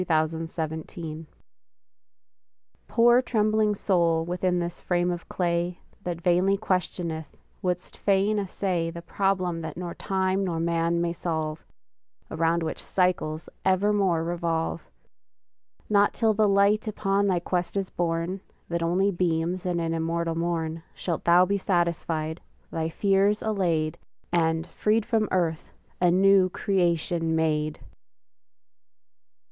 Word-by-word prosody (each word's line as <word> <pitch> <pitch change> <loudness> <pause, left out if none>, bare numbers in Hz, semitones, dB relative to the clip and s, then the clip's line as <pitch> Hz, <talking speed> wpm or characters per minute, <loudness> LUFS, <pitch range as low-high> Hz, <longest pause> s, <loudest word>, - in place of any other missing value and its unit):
LINES 155 0 +2
ON 160 - -4
IMMORTALITY 160 0 -5 1.6
Poor 240 +1 +5
trembling 215 -3 +1
soul 170 -5 +2
within 180 +1 0
this 175 0 -3
frame 175 0 +1
of 175 -1 -6
clay, 175 0 -1 0.2
That 175 -3 -4
vainly 180 +3 +3
questioneth, 175 -5 -2 0.2
wouldst 180 -1 -3
fain 205 +1 +2
essay 185 -3 -1
The 170 0 -8
problem 185 -3 0
that 160 - -6
nor 175 -1 -4
time 190 0 0
nor 170 -3 -2
man 170 0 +1
may 170 0 0
solve, 160 -3 -3 0.7
Around 165 +1 +1
which 160 - -4
cycles 180 -4 0 0.2
evermore 190 -3 +2
revolve! 165 -1 -2 1.0
Not 205 -1 +3
till 225 -2 +3
the 210 0 +3
light 200 +2 +3
upon 200 -1 +1
thy 185 -3 +2
quest 180 +2 -2
is 195 -1 -2
born, 170 +2 -2 0.3
That 170 0 -1
only 180 +4 +2
beams 175 0 -1
in 175 -1 0
an 165 -1 -1
immortal 165 +1 -1
morn, 165 -1 -2
Shalt 170 -3 -3
thou 175 +1 +6
be 200 +2 0
satisfied, 170 -3 -1 0.3
thy 160 0 -2
fears 200 +3 +2
allayed, 170 -8 0 0.3
And, 160 -1 +1
freed 215 +3 0
from 225 -3 +1
earth, 165 -3 -1 0.3
a 180 - +5
new 190 +1 +5
creation 170 -4 0
made! 155 -1 0
175 Hz, 125 wpm, -26 LUFS, 165-195 Hz, 1.6 s, thou